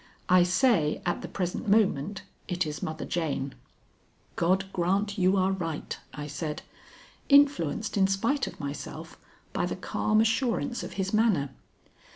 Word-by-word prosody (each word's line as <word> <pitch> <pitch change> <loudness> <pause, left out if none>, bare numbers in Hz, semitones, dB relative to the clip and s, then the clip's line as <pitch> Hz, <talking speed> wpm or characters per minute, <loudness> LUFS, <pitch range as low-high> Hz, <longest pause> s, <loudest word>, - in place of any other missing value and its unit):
I 180 0 +7
say 180 - +3
at 175 - -1
the - - -6
present 180 +2 -3
moment 200 -3 +2 0.2
it 180 -2 0
is 150 -2 -5
Mother 155 0 -4
Jane." 140 -5 -2 0.8
"God 185 +3 +2
grant 195 +4 0
you 185 +2 +4
are 190 0 +2
right," 165 -5 -3 0.2
I 145 +2 -6
said, 150 +1 -4 0.7
influenced 275 - +4
in 190 -1 +5
spite 230 +9 0
of - - -9
myself 140 +1 -7 0.3
by - - 0
the - - -3
calm 215 0 0
assurance 240 +2 +1
of - - -7
his 190 0 -2
manner. 205 - +2
185 Hz, 145 wpm, -28 LUFS, 160-215 Hz, 0.8 s, I